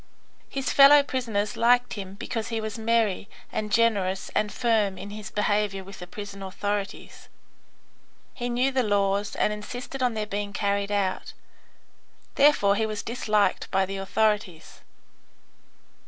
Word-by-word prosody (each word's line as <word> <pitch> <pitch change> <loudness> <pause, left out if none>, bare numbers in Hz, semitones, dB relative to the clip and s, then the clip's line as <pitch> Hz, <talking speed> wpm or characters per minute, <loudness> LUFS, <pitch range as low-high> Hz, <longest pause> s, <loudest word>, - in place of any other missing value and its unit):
His 270 -1 -2
fellow 285 +1 +8
prisoners 225 -7 -2
liked 245 +1 +3
him 195 -2 -7
because 225 0 -4
he 230 -2 -2
was 220 0 -5
merry 225 -3 +1 0.2
and 210 -1 -3
generous 200 -4 +1
and 210 -1 0
firm 215 -5 +1
in 200 +2 -8
his 215 0 -7
behaviour 205 -2 0
with 195 +1 -11
the 180 - -8
prison 200 +1 -8
authorities. 200 +1 -5 1.0
He 245 -1 -4
knew 250 +3 +1
the 265 -1 +1
laws 200 -2 0
and 210 - +1
insisted 245 +6 -7
on 245 -3 +1
their 215 -1 -2
being 205 -1 -4
carried 200 0 -1
out. 195 -2 -1 1.0
Therefore 280 -9 +4
he 220 +1 0
was 215 -1 -4
disliked 215 -3 0
by 190 0 +2
the 195 +1 -5
authorities. 195 -3 -1
210 Hz, 140 wpm, -26 LUFS, 200-230 Hz, 1.0 s, fellow